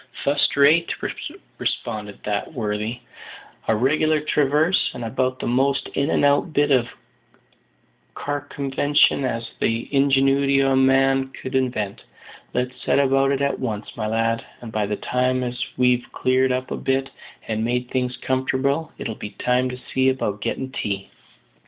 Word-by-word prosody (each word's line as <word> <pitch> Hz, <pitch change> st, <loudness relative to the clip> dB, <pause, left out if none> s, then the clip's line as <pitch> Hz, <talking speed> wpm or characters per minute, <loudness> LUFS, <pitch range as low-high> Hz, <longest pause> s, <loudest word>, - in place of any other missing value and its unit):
"Fust 145 Hz, +1 st, +2 dB
rate," 155 Hz, +4 st, +5 dB, 0.7 s
responded 105 Hz, -2 st, -3 dB
that 105 Hz, -1 st, -2 dB
worthy; 110 Hz, +1 st, -3 dB, 0.7 s
"a 110 Hz, -, +3 dB
reg'lar 155 Hz, +6 st, +2 dB
traverse, 150 Hz, +3 st, +2 dB
and 120 Hz, -, -5 dB
about 130 Hz, +2 st, -1 dB
the -, -, -5 dB
most 135 Hz, +3 st, +1 dB
in 140 Hz, +2 st, -1 dB
and -, -, +2 dB
out 145 Hz, +3 st, +2 dB
bit 145 Hz, 0 st, +2 dB
of 125 Hz, -2 st, +3 dB, 1.3 s
carcumvention 145 Hz, 0 st, +1 dB
as 115 Hz, -2 st, -2 dB
the 115 Hz, +1 st, 0 dB
ingenuity 135 Hz, 0 st, +3 dB
o' 135 Hz, 0 st, +3 dB
man 135 Hz, 0 st, +3 dB
could 130 Hz, 0 st, -8 dB
invent. 120 Hz, -6 st, -1 dB, 0.5 s
Let's 125 Hz, +1 st, -3 dB
set -, -, +1 dB
about 135 Hz, 0 st, +3 dB
it 140 Hz, 0 st, 0 dB
at 140 Hz, -, 0 dB
once, 110 Hz, -5 st, -4 dB
my 110 Hz, -2 st, -2 dB
lad; 115 Hz, +1 st, 0 dB, 0.2 s
and 120 Hz, -2 st, -9 dB
by 105 Hz, -2 st, -1 dB
the 105 Hz, -, -1 dB
time 125 Hz, +3 st, 0 dB
as 125 Hz, 0 st, -3 dB
we've 125 Hz, -1 st, +2 dB
cleared 130 Hz, 0 st, +2 dB
up 130 Hz, 0 st, -2 dB
a -, -, -2 dB
bit, 135 Hz, 0 st, -1 dB, 0.4 s
and 110 Hz, 0 st, -1 dB
made 125 Hz, +1 st, -1 dB
things 125 Hz, -1 st, -1 dB
comfortable, 130 Hz, +4 st, 0 dB
it'll 115 Hz, -, -4 dB
be 105 Hz, -, -7 dB
time 125 Hz, +1 st, +1 dB
to 125 Hz, -, -6 dB, 0.2 s
see 130 Hz, 0 st, +3 dB
about 105 Hz, -6 st, -2 dB
gettin' 130 Hz, +4 st, -3 dB
tea." 100 Hz, -6 st, -4 dB
130 Hz, 150 wpm, -22 LUFS, 120-140 Hz, 1.3 s, rate